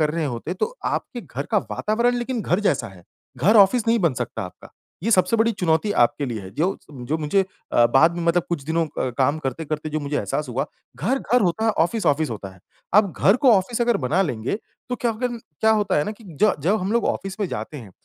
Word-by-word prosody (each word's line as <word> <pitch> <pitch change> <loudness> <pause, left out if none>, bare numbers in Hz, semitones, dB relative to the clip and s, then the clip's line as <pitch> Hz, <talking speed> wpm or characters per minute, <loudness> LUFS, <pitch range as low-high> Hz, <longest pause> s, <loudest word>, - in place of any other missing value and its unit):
कर 150 -1 +2
रहे 165 0 -1
होते, 135 +6 -4
तो 460 - -2
आपके - - -2
घर - - -6
का - - +4
वातावरण 235 +3 +1
लेकिन 240 -1 -2
घर 180 +2 +1
जैसा 195 -9 +1
है, 95 -3 -15 0.4
घर 200 - +4
ऑफ़िस 215 +4 +5
नहीं 230 +1 +4
बन 170 - +2
सकता 120 -3 -4
आपका। 90 - -10 0.3
ये 225 - 0
सबसे 185 +1 +4
बड़ी 225 +1 +3
चुनौती 175 +1 +1
आपके 140 +4 +1
लिए 115 -4 -4
है। 95 - -9
जो 180 +5 0
जो 135 +2 -3
मुझे 160 +6 +1 0.3
अ, 120 0 +5
बाद 160 +8 +4
में 175 - -3
मतलब 170 0 +3
कुछ 170 -5 -2
दिनों 165 +1 0
क 130 - 0
काम 140 +4 +2
करते-करते 155 +2 -4
जो 155 - -2
मुझे 145 0 -2
एहसास 150 -2 -2
हुआ 125 +1 -2 0.3
घर, 265 +3 0
घर 250 -1 +2
होता 185 +5 0
है, 225 - +4
ऑफ़िस, 205 +4 0
ऑफ़िस 145 -1 +2
होता 100 -3 -6
है। 95 - -21 0.3
आप 200 -3 +5
घर 195 +5 +5
को 255 -3 +5
ऑफ़िस 220 +5 +1
अगर 235 -2 +3
बना 180 +8 +2
लेंगे, 125 - -2 0.3
तो 250 - -2
क्या 240 - 0
हो 220 - -6
गया 245 -1 -2 0.2
क्या 220 - +4
होता 210 -6 +2
है 145 - +1
ना - - -3
कि 225 - -14 0.2
ज 215 - +6
जब 200 +5 +3
हम 195 +4 -2
लोग 235 -1 +2
ऑफ़िस 195 0 -3
में 200 - +1
जाते 155 - -5
हैं, 115 -8 -10
175 Hz, 245 wpm, -23 LUFS, 145-220 Hz, 0.4 s, ज